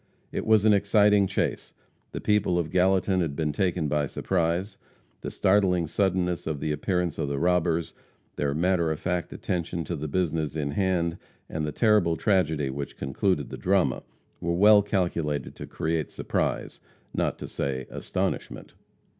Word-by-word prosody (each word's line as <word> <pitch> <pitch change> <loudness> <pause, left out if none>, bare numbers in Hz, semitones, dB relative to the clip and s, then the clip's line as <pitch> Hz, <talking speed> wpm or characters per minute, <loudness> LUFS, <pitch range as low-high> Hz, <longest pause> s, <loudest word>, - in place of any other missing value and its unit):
It - - -4
was 110 -1 +5
an 110 - +6
exciting 100 0 +4
chase. 100 - -2 0.4
The - - -5
people 105 -4 +2
of 85 -2 -1
Gallatin 95 0 +2
had 80 -5 -2
been 75 -1 -1
taken 90 -2 0
by 75 0 0
surprise. 90 +4 -1 0.4
The - - -4
startling 95 -3 +2
suddenness 90 +1 0
of 75 -3 -2
the 75 - -2
appearance 90 +2 -1
of 70 - -1
the 70 - -2
robbers; 85 0 +1 0.4
their 70 -1 -1
matter 85 0 +2
of 80 - -3
fact 90 -1 -2
attention 85 -1 -3
to 85 - -4
the 75 0 -4
business 80 -2 -1
in 70 -2 -2
hand, 85 -1 0 0.3
and 75 -1 -3
the - - -2
terrible 105 -4 +3
tragedy 80 - +1
which 70 0 -6
concluded 75 +3 -1
the - - -5
drama, 90 -9 +1 0.4
were 85 0 -1
well 105 +3 +7
calculated 85 -8 -1
to - - -7
create 80 -1 -2
surprise, - - -2 0.3
not - - -1
to - - -7
say 65 -2 -3
astonishment. - - -3
85 Hz, 160 wpm, -26 LUFS, 75-95 Hz, 0.4 s, well